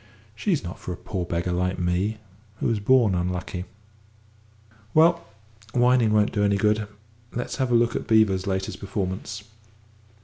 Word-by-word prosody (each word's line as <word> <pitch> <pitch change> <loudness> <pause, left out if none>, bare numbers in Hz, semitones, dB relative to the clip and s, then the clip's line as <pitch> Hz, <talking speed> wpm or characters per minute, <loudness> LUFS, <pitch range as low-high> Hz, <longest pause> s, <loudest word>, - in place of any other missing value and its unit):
She's 165 - -1
not 90 +1 -7
for - - -6
a 90 - -5
poor 95 -4 -4
beggar 85 +1 -1
like 90 +1 0
me, 90 +5 0 0.4
who - - -5
was 115 -3 +1
born 115 -1 +4
unlucky. 90 0 -2 1.3
Well, 170 +2 +5 0.5
whining 125 -2 +4
won't 105 -1 +3
do 105 -2 0
any 100 -1 +3
good 105 +1 +1 0.5
let's 120 - -4
have 130 -3 0
a - - +4
look 115 0 +3
at - - -3
Beevor's 105 -4 +3
latest 95 -1 -2
performance." 100 +1 -4
105 Hz, 150 wpm, -25 LUFS, 90-115 Hz, 1.3 s, Well